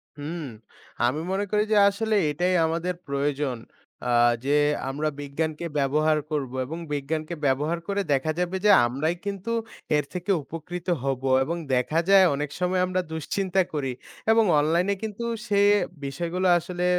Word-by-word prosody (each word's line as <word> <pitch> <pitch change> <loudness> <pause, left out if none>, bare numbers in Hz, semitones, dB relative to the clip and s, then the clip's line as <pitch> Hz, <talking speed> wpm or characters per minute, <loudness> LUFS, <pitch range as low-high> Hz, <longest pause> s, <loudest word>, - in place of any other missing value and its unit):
হুম। 155 +3 -5 0.6
আমি 130 +5 +1
মনে 195 +1 0
করি 210 0 +3
যে 215 - +4
আসলে 220 +2 -1
এটাই 175 +5 0
আমাদের 170 +3 -1
প্রয়োজন। 140 -2 -1 0.5
অ্যা 125 0 0 0.3
যে 145 +1 +2 0.3
আমরা 150 +3 -1
বিজ্ঞানকে 155 +3 -3
ব্যবহার 155 +3 +2
করব 140 -5 -2
এবং 160 +6 -6 0.2
বিজ্ঞানকে 155 +4 -3
ব্যবহার 150 +5 +1
করে 200 0 0
দেখা 140 +3 +1
যাবে 180 +1 -1
যে 210 - +7 0.2
আমরাই 145 +8 -1
কিন্তু 200 +2 -4 0.5
এর 150 - 0
থেকে 180 +2 -2
উপকৃত 165 +4 -7 0.2
হব 135 -1 -2 0.2
এবং 165 +5 -3 0.2
দেখা 125 +6 +1
যায় 195 -1 +8
অনেক 145 +1 -3
সময় 180 0 +1
আমরা 185 0 0
দুশ্চিন্তা 190 +4 0
করি 135 -4 -2 0.4
এবং 225 0 +5 0.2
অনলাইনে 170 +6 +2
কিন্তু 220 +1 -4 0.2
সে 200 -2 +2 0.5
বিষয়গুলো 170 +6 -2
আসলে 180 +1 -3
160 Hz, 150 wpm, -25 LUFS, 145-185 Hz, 0.6 s, যায়